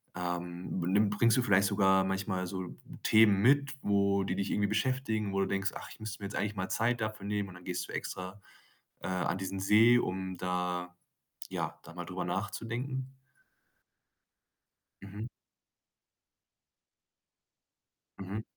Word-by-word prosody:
ähm 90 0 -3
b 85 - -1
nimm 100 +2 +4
bringst 115 +3 +3
du - - +4
vielleicht 100 -3 +4
sogar 95 -1 +4
manchmal 95 -1 -1
so 95 -1 -5 0.3
Themen 105 -3 +6
mit, 140 +4 +4
wo 100 -1 +2
die 95 -1 -1
dich 100 0 -1
irgendwie 100 0 +2
beschäftigen, 110 -2 0
wo 100 - +1
du - - +1
denkst: 100 +1 0
„Ach, - - -7
ich - - -12
müsste 110 -1 -6
mir - - -4
jetzt 100 - -7
eigentlich 105 +1 -1
mal 95 -2 -3
Zeit 120 +1 +1
dafür 110 -2 -3
nehmen“ 100 -1 -1
und 90 - -11
dann 90 - -13
gehst 90 -1 -3
du - - -7
extra, 95 +2 -5 0.6
äh, - - -4
an 90 -1 0
diesen 95 0 -3
See, 110 +5 +6
um 95 -2 -3
da 90 -1 -2 0.5
ja, - - -3
da 85 - -12
mal 90 0 -6
drüber - - -4
nachzudenken? 130 +3 -3 1.9
Mhm. 100 +3 -6 2.9
Mhm. 100 +3 -4
100 Hz, 150 wpm, -31 LUFS, 95-110 Hz, 2.9 s, Themen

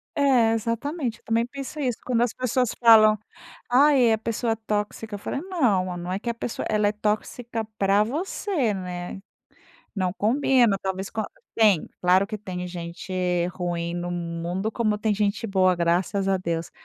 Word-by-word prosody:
É, 255 -6 +4
exatamente. 230 +2 -2
Eu - - -33
também 230 +1 +1
penso 275 +4 -7
isso. 250 -5 -1
Quando 240 -2 +1
as 240 -2 +1
pessoas 250 -1 0
falam: 220 -2 +7 0.5
"Ai, 260 -1 +5
a 220 - +3
pessoa 225 +1 -1
tóxica," 210 0 -3
eu - - -7
falei: 240 - -3
"Não, 230 - 0
não 175 +1 -5
é 190 - -1
que 235 - -4
a - - 0
pessoa 235 0 -4
ela 210 -1 +2
é - - +2
tóxica 215 +2 -2
pra 200 +1 +3
você, 295 - -1
né." 180 -1 -5 0.8
Não 185 -3 0
combina. 235 0 +3
Talvez 190 0 -3
com 220 - -3
a 215 - -2 0.3
tem, 210 -7 +4
claro 185 +2 +4
que 215 +1 -6
tem 185 -3 -5
gente 170 +1 -7 0.4
ruim 175 -2 -3
no 175 0 -3
mundo 175 +4 -3
como 215 -2 0
tem 215 0 0
gente 205 +2 0
boa, 190 -3 +3
graças 180 +4 0
a 195 - +3
Deus. 170 -2 -3
215 Hz, 170 wpm, -25 LUFS, 185-235 Hz, 0.8 s, falam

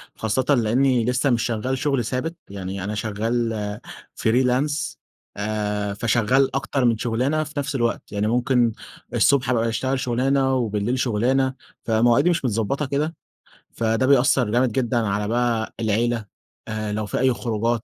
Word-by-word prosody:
خاصةً 110 +4 -1
لأني 120 +1 +2
لسه 125 +3 +1
مش 120 -3 +2
شغال 125 +3 -1
شغل 135 -3 0
ثابت، 130 +8 -3
يعني 95 -1 -5
أنا 105 +2 -3
شغال 110 0 -2 0.4
فريلانس 130 +5 0 0.4
آآ، 105 -1 -2
فشغال 120 +5 +2
أكتر 135 -1 0
من 115 -2 +3
شغلانة 125 +7 0
في 150 0 -10
نفس 140 0 -3
الوقت، 120 -3 -1
يعني 105 +1 -1
ممكن 120 0 +2 0.4
الصبح 135 -3 +3
أبقى 115 -2 +1
أشتغل 130 +3 -1
شغلانة، 130 +2 +1
وبالليل 115 0 -1
شغلانة، 130 +3 +1 0.3
فمواعيدي 120 +7 +3
مش 170 -5 0
متضبطة 115 +5 0
كده، 150 +4 -1 0.6
فده 115 +2 0
بيأثّر 130 -3 +4
جامد 120 +1 +2
جدًا 120 0 0
على 105 -2 0
بقى 115 -1 0
العيلة، 115 +1 0 0.4
آآ 110 -1 -3
لو 110 0 -2
في 100 - -3
أي 130 -1 +3
خروجات 115 0 -1
120 Hz, 145 wpm, -23 LUFS, 110-130 Hz, 0.6 s, بيأثّر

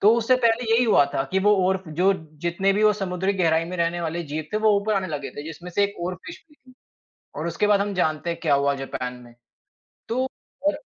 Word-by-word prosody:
तो 215 +3 +6
उससे 235 +2 +3
पहले 230 0 +2
यही 245 +2 +4
हुआ 210 -10 +5
था 135 - +1
कि 190 - +3
वो 210 - +7
ओर 190 0 0
जो 180 +5 +2 0.3
जितने 180 +3 +1
भी 210 +2 0
वो 210 - +6
समुद्री 190 -1 -1
गहराई 165 -3 +2
में 180 +2 -6
रहने 170 0 0
वाले 170 +1 -3
जीव 155 0 -2
थे 215 - +1
वो 215 - +7
ऊपर 215 +1 0
आने 190 -1 0
लगे 145 -2 -4
थे 145 - -5
जिसमें 170 +3 -8
से 205 - +1
एक 200 - -4
ओरफ़िश 185 - -8
भी 295 - -23
थी 255 -2 -21 0.6
और 160 +2 -3
उसके 170 +5 0
बाद 205 -1 +4
हम 205 0 -2
जानते 155 -2 0
हैं 170 - -3
क्या 155 -4 +2
हुआ 140 0 +1
जापान 130 -2 -5
में। 120 - -16 0.8
तो 255 +3 0 0.4
और 300 - +1
180 Hz, 235 wpm, -24 LUFS, 160-210 Hz, 0.8 s, वो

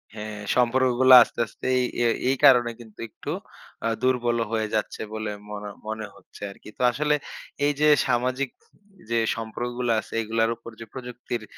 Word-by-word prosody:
হ্যাঁ, 105 0 -6 0.2
সম্পর্কগুলা 130 +1 +5
আস্তে, - - -11
আস্তে - - -12
এই 125 - +2 0.2
এই 115 - +3 0.2
এই 135 - +3
কারণে 120 -3 +7
কিন্তু 110 -3 -15
একটু - - -7 0.5
অ্যা 115 - 0
দুর্বল 120 -2 +1
হয়ে 110 -1 0
যাচ্ছে 105 - -2
বলে 110 -1 -3 0.2
মনে 105 0 -6 0.2
মনে 110 0 -4
হচ্ছে - - -17
আরকি। 100 - -14
তো - - -7
আসলে 150 +4 +1 0.5
এইযে 145 +1 +2 0.2
সামাজিক 130 +2 0 0.6
যে 115 - +1 0.2
সম্পর্কগুলা 120 +2 -2
আছে - - -10
এগুলার 115 +1 +1
উপর 115 0 -11
যে 115 - -7
প্রযুক্তির 120 -2 -6
120 Hz, 155 wpm, -25 LUFS, 110-125 Hz, 0.6 s, কারণে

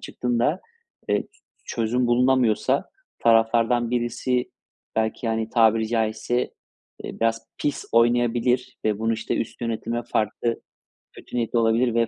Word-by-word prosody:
çıktığında, 125 +7 -1 0.5
eee, - - +1 0.4
çözüm 120 +2 0
bulunamıyorsa 125 -2 +2 0.3
taraflardan 115 +1 +3
birisi 125 +1 -1 0.5
belki, 110 +1 -1
hani, 110 0 -1
tabiri 110 -1 +3
caizse, 115 +1 0 0.5
eee, - - -7
biraz 115 0 0
pis 145 -2 -2
oynayabilir 120 +2 +2
ve 105 -1 +1
bunu, 115 +1 0
işte, 115 0 -2
üst 115 - -4
yönetime 115 0 -2
farklı 115 +1 -1 0.5
kötü - - -11
niyetli 120 0 +1
olabilir 115 +1 +2
ve 115 0 +3
115 Hz, 120 wpm, -24 LUFS, 115-120 Hz, 0.5 s, taraflardan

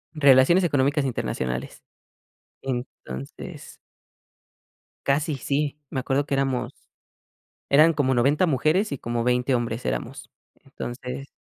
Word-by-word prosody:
Relaciones 140 +5 +6
económicas 145 -2 +2
internacionales. 65 - -3 0.8
Entonces 120 - -7 1.3
Casi 145 +2 +1
sí, 145 +2 -1
me 130 - -2
acuerdo 135 +2 0
que 140 - -3
éramos 135 -2 0 1.0
eran 155 +4 +6
como 140 -3 +1
90 140 +8 +3
mujeres 155 - +2
y - - -3
como 120 -1 -2
20 125 +1 +2
hombres 120 0 -2
éramos. - - -4 0.3
Entonces 125 +2 -6
135 Hz, 105 wpm, -25 LUFS, 125-145 Hz, 1.3 s, Relaciones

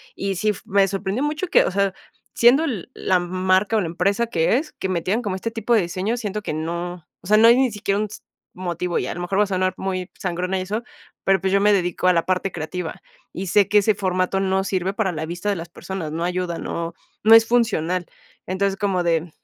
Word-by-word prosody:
Y 195 -1 -2
sí 215 +3 +1
f 205 - -2
me 195 0 +3
sorprendió 195 +6 -2
mucho 300 +4 -1
que, - - +5
o - - -1
sea, 195 0 +1 0.4
siendo 245 +6 +5
l 235 - -3
la 185 -1 +1
marca 185 +4 +1
o 210 - +2
la - - -2
empresa 195 +7 0
que 195 0 +2
es, 300 +3 -4
que 190 - -4
metieran 185 +5 0
como 200 -5 -3
este 230 +5 -4
tipo 225 +1 +1
de 220 - +4
diseño, 190 +6 -2
siento 210 -3 -3
que - - -4
no, 170 +2 -4
o 180 - -12
sea, 215 +2 +5
no 225 +1 +7
hay 235 +2 +7
ni 260 -3 +2
siquiera, 205 -1 -1
un 215 - 0
s 210 - -10 0.3
motivo, 180 -1 -2
y - - -1
a - - -3
lo 175 - -6
mejor 190 +2 -2
voy 210 - +5
a 205 - -2
sonar 185 -1 0
muy 185 -1 -3
sangrona 180 +1 -2
y - - -2
eso, 210 +4 -3 0.4
pero 195 0 +3
pues, 190 +2 -1
yo 200 - +4
me 210 0 +5
dedico 180 -1 0
a 180 - +6
la 165 -1 +1
parte 185 +1 0
creativa, 160 +1 -5 0.3
y 190 +1 -5
sé 200 +3 +4
que 210 - +6
ese 215 +2 +3
formato 185 -1 0
no 190 0 +1
sirve 190 -1 -1
para 195 -4 0
la 160 -1 -4
vista 175 +4 -5
de 200 - +1
las 165 +1 -7
personas, 175 -3 -6
no 165 +2 -3
ayuda, 180 -1 -2
no 170 0 -4 0.3
no 225 +1 +8
es 225 0 +7
funcional. 185 -8 +1 0.4
Entonces, 195 +1 0
como 195 -4 0
de, 165 -2 +2
mm, 175 - -11
190 Hz, 245 wpm, -22 LUFS, 180-210 Hz, 0.4 s, no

